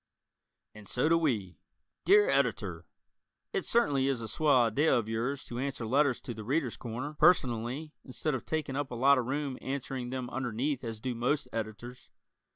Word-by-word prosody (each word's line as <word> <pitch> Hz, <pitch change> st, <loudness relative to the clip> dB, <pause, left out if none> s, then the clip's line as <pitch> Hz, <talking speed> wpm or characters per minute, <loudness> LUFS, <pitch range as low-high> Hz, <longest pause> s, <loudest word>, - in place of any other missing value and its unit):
And 105 Hz, -1 st, -13 dB
So 125 Hz, +5 st, +1 dB
Do 165 Hz, -, +5 dB
We 110 Hz, -, -1 dB, 0.5 s
Dear 415 Hz, +2 st, +6 dB
Editor: -, -, 0 dB, 0.7 s
It 395 Hz, -, -1 dB
certainly 145 Hz, -, +2 dB
is 135 Hz, -3 st, 0 dB
a 115 Hz, -, -5 dB
swell 140 Hz, +1 st, +3 dB
idea 125 Hz, +8 st, +3 dB
of 115 Hz, -2 st, -1 dB
yours 120 Hz, +6 st, -2 dB
to 120 Hz, -, -6 dB
answer 135 Hz, -3 st, -3 dB
letters 135 Hz, +2 st, +2 dB
to 120 Hz, -, -6 dB
"The 110 Hz, -1 st, -8 dB
Readers' 130 Hz, +1 st, 0 dB
Corner" 125 Hz, +5 st, -5 dB
personally 150 Hz, -2 st, +2 dB
instead 145 Hz, +3 st, -2 dB
of 130 Hz, -, -3 dB
taking 155 Hz, -4 st, -2 dB
up 145 Hz, -1 st, -2 dB
a 125 Hz, -, -6 dB
lot 135 Hz, +3 st, +5 dB
of 120 Hz, -, -3 dB
room 140 Hz, -1 st, -2 dB
answering 130 Hz, -2 st, -4 dB
them 130 Hz, -1 st, -4 dB
underneath 130 Hz, +2 st, -2 dB
as 115 Hz, -2 st, -5 dB
do 125 Hz, +2 st, -3 dB
most 125 Hz, +4 st, 0 dB
Editors. 115 Hz, +3 st, -6 dB
130 Hz, 175 wpm, -30 LUFS, 120-145 Hz, 0.7 s, Dear